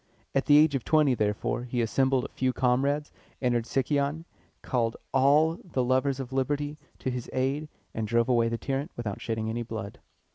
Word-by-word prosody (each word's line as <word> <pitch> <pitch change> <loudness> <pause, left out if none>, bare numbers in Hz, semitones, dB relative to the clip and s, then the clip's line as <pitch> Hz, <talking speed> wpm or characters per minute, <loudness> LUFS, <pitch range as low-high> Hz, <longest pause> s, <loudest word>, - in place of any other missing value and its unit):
At 135 - +1
the 145 - +7
age 150 0 +5
of 135 -4 -1
twenty, 155 -4 +4
therefore, 105 +2 -1
he 125 0 -3
assembled 130 +3 +2
a - - -6
few 130 -1 -1
comrades, 140 +4 +1 0.3
entered 120 -2 0
Sicyon, 140 +4 0 0.4
called 115 -3 0 0.2
all 150 +5 +4
the 135 -8 -1
lovers 130 +2 +1
of 130 -1 -6
liberty 145 +3 -1 0.2
to 130 - -3
his 125 -1 -5
aid, 135 +4 -1 0.2
and 110 -1 -2
drove 115 +1 +2
away 120 -2 +3
the 115 - -2
tyrant 135 +5 -2
without 110 -4 -4
shedding 110 -1 -2
any 115 +2 -2
blood. 110 -3 -6
130 Hz, 180 wpm, -28 LUFS, 120-140 Hz, 0.4 s, the